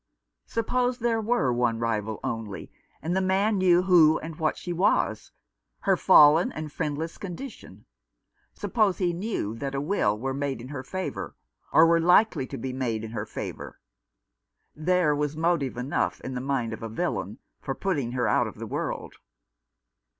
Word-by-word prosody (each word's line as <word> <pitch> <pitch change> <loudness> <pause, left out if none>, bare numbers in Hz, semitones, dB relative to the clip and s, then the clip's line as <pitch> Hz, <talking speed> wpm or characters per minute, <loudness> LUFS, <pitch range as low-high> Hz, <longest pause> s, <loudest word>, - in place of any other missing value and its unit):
Suppose 245 +2 0
there 230 -2 0
were 210 - +1
one 120 -1 +1
rival 110 -2 -2
only, 110 -4 -5 0.3
and 170 +3 -1
the 190 - +2
man 195 +2 +2
knew 180 -1 +4
who 165 -4 +6
and 160 0 -7
what 155 -1 0
she 175 - -4
was 165 - +1 0.2
— - - -54
her - - +3
fallen 150 +4 +6
and 155 -1 -6
friendless 160 +1 -3
condition; 180 - -9 0.7
suppose 205 -1 0
he 175 -2 0
knew 175 - -3
that 135 +4 -4
a - - 0
will 140 - +1
were 135 +4 -3
made 140 -1 -2
in 125 +2 -9
her 145 -3 -5
favour, 130 - -5 0.4
or 160 - +7
were 165 0 +4
likely 180 -4 +4
to - - -6
be 130 +2 -4
made 120 -4 -2
in 110 - -6
her 105 -2 -4
favour— - - -7 1.0
there 170 -1 +2
was 150 +1 -2
motive 160 -6 0
enough 125 +3 -1
in 130 - -6
the 125 - -3
mind 130 -4 -1
of - - -7
a 115 - -5
villain 110 - -3 0.2
for 135 - -3
putting 140 -11 -2
her 125 -1 0
out - - +2
of - - -8
the - - -7
world. - - -4
150 Hz, 170 wpm, -26 LUFS, 120-180 Hz, 1.0 s, or